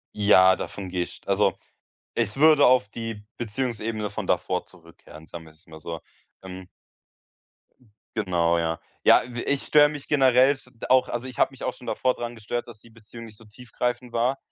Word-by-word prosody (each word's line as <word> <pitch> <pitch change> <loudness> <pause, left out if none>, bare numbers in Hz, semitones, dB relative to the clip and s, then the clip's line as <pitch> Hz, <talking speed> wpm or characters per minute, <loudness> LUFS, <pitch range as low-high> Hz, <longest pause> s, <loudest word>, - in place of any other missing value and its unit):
Ja, 95 -3 +5
davon 95 0 -7
gehe 90 -1 -1
ich - - -8
also, - - +2 0.6
ich 110 -3 -1
würde 150 0 +6
auf 125 -5 +4
die 115 -1 -7
Beziehungsebene 110 -3 -3
von - - -5
davor - - -1
zurückkehren, 85 -2 -16
sagen 85 -1 -10
wir 80 - -16
es 80 - -20
mal 80 0 -12
so. 80 +1 -7 0.4
Ähm 95 0 -10 1.5
Genau, 85 -5 +1
ja. 80 0 -1 0.2
Ja, - - +6
äh, 120 0 -6
ich 140 -1 0
störe 150 -1 +5
mich 145 -2 -8
generell 130 -1 +4
s 135 -2 -7 0.2
auch, 130 0 +4
also 120 +2 -4
ich 125 - -10
habe - - +3
mich 135 - -12
auch - - -2
schon 125 - -14
davor 130 -1 0
dran 120 0 -6
gestört, 115 +2 -4
dass 110 -3 -12
die 115 - -18
Beziehung 115 +1 -12
nicht 110 -2 -14
so 115 - -16
tiefgreifend 125 +2 -4
war. 125 +4 +1
115 Hz, 185 wpm, -25 LUFS, 95-125 Hz, 1.5 s, würde